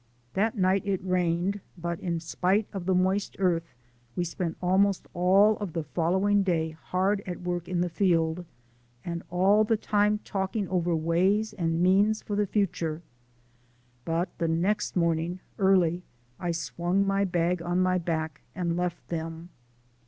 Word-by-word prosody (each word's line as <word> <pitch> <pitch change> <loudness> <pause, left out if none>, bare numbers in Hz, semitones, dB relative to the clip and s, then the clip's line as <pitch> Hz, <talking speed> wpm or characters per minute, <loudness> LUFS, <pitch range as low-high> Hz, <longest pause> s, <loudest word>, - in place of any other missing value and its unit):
That 215 +4 0
night 190 0 +3
it 195 -2 +1
rained, 180 +1 0 0.2
but 170 0 -3
in 170 -2 -2
spite 185 +5 0
of 190 -3 -5
the 190 - +3
moist 190 +2 +1
earth 170 -5 0 0.4
we 175 - 0
spent 170 -1 -3
almost 190 +2 +2
all 195 +4 +4
of 200 -6 -5
the 165 -2 -2
following 185 +8 +1
day 165 -4 0
hard 185 +5 -1
at 180 -1 -5
work 175 -1 -3
in 180 -1 -1
the 180 - +1
field, 170 -2 +1 0.6
and 170 -1 -3
all 195 +4 +4
the 220 +1 +1
time 210 0 +2
talking 195 +1 -2
over 175 -2 +1
ways 185 +7 +1
and 170 -3 0
means 200 +4 +3
for 205 - -3
the 205 0 +1
future, 170 -5 -1 1.0
but 165 +4 -2
the 165 - +1
next 185 +6 0
morning, 170 +1 0 0.2
early, 180 -3 +3 0.4
I 175 - -2
swung 175 +3 -1
my 195 0 +1
bag 175 -1 0
on 175 +1 0
my 185 0 +2
back 160 -3 -3
and 170 -2 -1
left 175 0 -3
them. 165 0 -5
180 Hz, 155 wpm, -27 LUFS, 170-195 Hz, 1.0 s, all